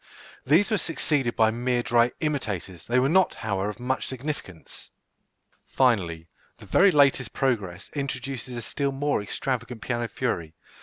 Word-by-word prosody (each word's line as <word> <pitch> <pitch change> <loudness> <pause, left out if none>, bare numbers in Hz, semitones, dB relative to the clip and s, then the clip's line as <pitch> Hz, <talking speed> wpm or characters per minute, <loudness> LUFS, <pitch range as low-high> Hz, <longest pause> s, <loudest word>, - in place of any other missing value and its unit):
These 175 - +4
were 215 - +2
succeeded 145 -7 0
by 110 -1 +4
mere 120 +1 0
dry 120 0 +3
imitators; 100 - -3
they 120 - +2
were 130 +1 +4
not, 185 +5 +3
however, 100 -2 -2
of 105 +2 -7
much 130 +2 -1
significance. 130 - -7 0.8
Finally, 90 -11 +1 0.3
the - - -13
very 200 +2 +5
latest 140 -5 +3
progress 100 -8 -1
introduces 135 -2 -4
a 120 - -4
still 140 +4 -1
more 145 -2 0
extravagant 120 +2 -3
piano 120 -1 -1
fury. 85 -11 -3
125 Hz, 145 wpm, -26 LUFS, 105-140 Hz, 0.8 s, very